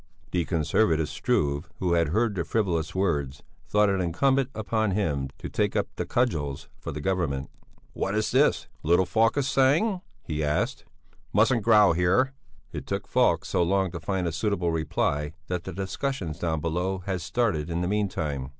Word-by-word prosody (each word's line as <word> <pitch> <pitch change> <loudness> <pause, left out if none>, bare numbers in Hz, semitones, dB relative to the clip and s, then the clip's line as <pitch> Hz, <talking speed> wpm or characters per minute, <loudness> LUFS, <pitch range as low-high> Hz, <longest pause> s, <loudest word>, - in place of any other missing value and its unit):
The 90 -2 0
conservative 80 -1 +1
Struve, 70 -1 0
who 90 -2 0
had 85 -1 +3
heard 110 +7 +1
the 90 -4 -1
frivolous 85 -7 -1
words, 75 -7 -1 0.2
thought 105 0 +3
it 95 -1 +1
incumbent 130 +10 +2 0.2
on 110 -2 +2
him 75 -9 -1
to - - -6
take - - -1
up - - 0
the - - -3
cudgels 75 - -1
for - - -5
the - - -5
Government. 85 -7 -1 0.4
"What 100 - -2
is 110 0 0
this, 120 - +3
little 85 +3 +3
Falk 115 +7 +2
is 140 -2 +1
saying?" 160 +11 +3 0.2
he 75 -1 -3
asked. 75 0 -1
"He - - -34 0.2
mustn't 115 +4 +4
growl 105 -4 +6
here." 95 +11 +2 0.4
It - - -6
took - - -3
Falk - - +2
so - - 0
long 95 +1 +1
to 85 - -5
find 95 +1 -2
a - - -1
suitable 90 0 0
reply 75 -2 -1 0.2
that 90 -1 -2
the 95 - -4
discussions 95 - -3
down 80 -3 -1
below 90 +4 -2
had 95 -2 -2
started 90 -4 0
in 85 +1 -1
the 90 - 0
meantime. 80 -10 -1
90 Hz, 175 wpm, -26 LUFS, 80-105 Hz, 0.4 s, growl